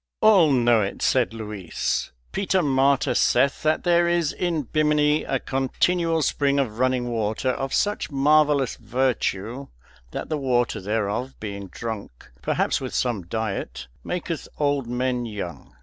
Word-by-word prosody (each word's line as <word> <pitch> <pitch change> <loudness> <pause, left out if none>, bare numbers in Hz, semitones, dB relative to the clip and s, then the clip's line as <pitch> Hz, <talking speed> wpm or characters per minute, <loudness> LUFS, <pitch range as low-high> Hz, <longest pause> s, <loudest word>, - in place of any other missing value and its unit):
"All 195 -8 +6
know 120 -3 +4
it," 100 - -3
said 125 -3 +2
Luis. 105 -5 -3 0.2
"Peter 190 -2 +1
Martyr 135 -1 +2
saith 135 +3 +2
that 155 0 +1
there 175 -1 +3
is 170 -3 +1
in 170 -4 -1
Bimini 150 +1 +2
a 135 - 0
continual 165 +6 0
spring 140 -1 +1
of 120 -5 -1
running 130 -1 +1
water 110 +3 0
of 135 +1 -3
such 205 0 0
marvellous 145 -1 +3
virtue 125 0 -1 0.4
that - - -5
the 155 -2 -2
water 125 -5 0
thereof, 110 +5 -2
being 100 -2 -6
drunk, 105 - -7
perhaps - - 0
with - - -5
some 110 -9 -1
diet, 105 - -4
maketh 170 -2 -4
old 145 -4 0
men 125 0 -1
young." 90 -9 -7
130 Hz, 140 wpm, -24 LUFS, 110-150 Hz, 0.4 s, All